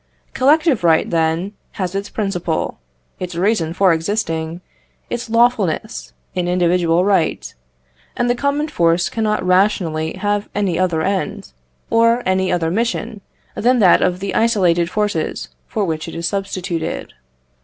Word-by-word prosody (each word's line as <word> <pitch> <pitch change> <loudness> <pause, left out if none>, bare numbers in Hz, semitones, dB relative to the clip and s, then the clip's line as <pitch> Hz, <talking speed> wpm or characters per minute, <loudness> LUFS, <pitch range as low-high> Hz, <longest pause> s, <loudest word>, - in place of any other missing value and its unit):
Collective 285 - +3
right, 165 -2 +4
then, 165 +4 0 0.2
has 185 -3 -3
its 200 +1 -3
principle, 180 - -2 0.4
its 180 -1 -5
reason 175 -3 +1
for 185 0 +3
existing, 165 -2 -2 0.5
its 240 -1 -4
lawfulness, 230 -3 +1 0.2
in 180 -1 -1
individual 175 -1 +2
right; 190 -6 0 0.6
and 240 - +1
the 245 - +3
common 280 +4 -1
force 170 - +1
cannot 215 -3 -1
rationally 180 -4 +1
have 205 0 -2
any 190 -4 0
other 175 -4 +1
end, 190 - -2 0.4
or 230 +1 +3
any 185 0 +1
other 165 -2 0
mission, 230 0 -2 0.3
than 250 +2 +2
that 190 -6 +5
of 180 0 0
the 195 -1 -3
isolated 180 -7 +2
forces 205 -6 -2 0.2
for 210 -2 -1
which 160 -2 -3
it 165 - -7
is 170 +1 -2
substituted. 190 -4 -3
185 Hz, 135 wpm, -19 LUFS, 170-220 Hz, 0.6 s, that